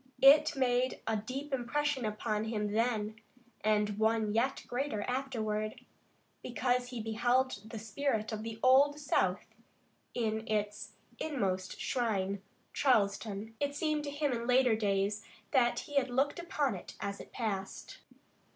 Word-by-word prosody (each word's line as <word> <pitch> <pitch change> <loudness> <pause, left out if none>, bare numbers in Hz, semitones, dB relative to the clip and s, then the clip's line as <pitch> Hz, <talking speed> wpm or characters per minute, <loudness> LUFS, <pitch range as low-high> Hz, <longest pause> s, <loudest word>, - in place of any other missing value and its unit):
It 280 +3 +8
made 255 -1 +1
a 225 - +1
deep 265 +7 -4
impression 270 +1 0
upon 215 0 -1
him 210 -2 -1
then, 220 -1 0 0.5
and 210 -1 +2
one 220 -1 +2
yet 255 +5 +1
greater 245 -4 -2
afterward, 220 -5 -2 0.6
because 245 0 0
he 245 -1 -6
beheld 225 0 0
the 225 - -6
spirit 220 +1 -1
of 215 -1 -3
the 225 0 -6
Old 275 +3 +6
South 290 - +1 0.7
in 220 -1 -1
its 210 -1 -2 0.3
inmost 195 -11 -2
shrine, 200 -6 -1 0.3
Charleston. 210 -3 +1
It 285 0 -1
seemed 305 -1 0
to - - -3
him 290 0 0
in 235 -1 -2
later 250 -2 +5
days 205 0 0 0.3
that 245 -4 +3
he 290 - -5
had 265 -2 +3
looked 275 +6 +1
upon 295 -7 0
it 185 - -8
as 200 0 -4
it - - -13
passed. 195 -5 -4
230 Hz, 140 wpm, -32 LUFS, 215-265 Hz, 0.7 s, It